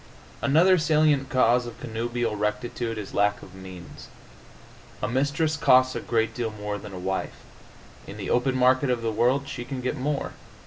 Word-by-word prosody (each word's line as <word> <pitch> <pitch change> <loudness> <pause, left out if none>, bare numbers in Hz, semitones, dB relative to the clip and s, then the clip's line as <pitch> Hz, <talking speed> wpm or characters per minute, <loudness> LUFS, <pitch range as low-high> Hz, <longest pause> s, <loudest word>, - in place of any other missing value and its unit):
Another 170 +6 +4
salient 150 -3 +2
cause 125 -1 +3
of 120 - -10
connubial 115 0 -2
rectitude 105 +2 -2
is 105 -2 -7
lack 105 0 +1
of 95 - -13
means. 95 -2 -11 0.9
A 105 - -2
mistress 145 +6 0
costs 130 -2 +4
a - - -1
great 115 -1 0
deal 120 -2 -2
more 105 -1 -5
than 105 - -10
a 95 - -7
wife; 95 +1 -3 0.7
in - - -8
the - - -4
open 125 +2 +2
market 130 +2 +3
of 120 -2 0
the 115 - 0
world 125 +5 +1
she 120 - -5
can 130 +1 -6
get 125 0 -2
more. 140 +2 -2
120 Hz, 175 wpm, -25 LUFS, 105-135 Hz, 0.9 s, Another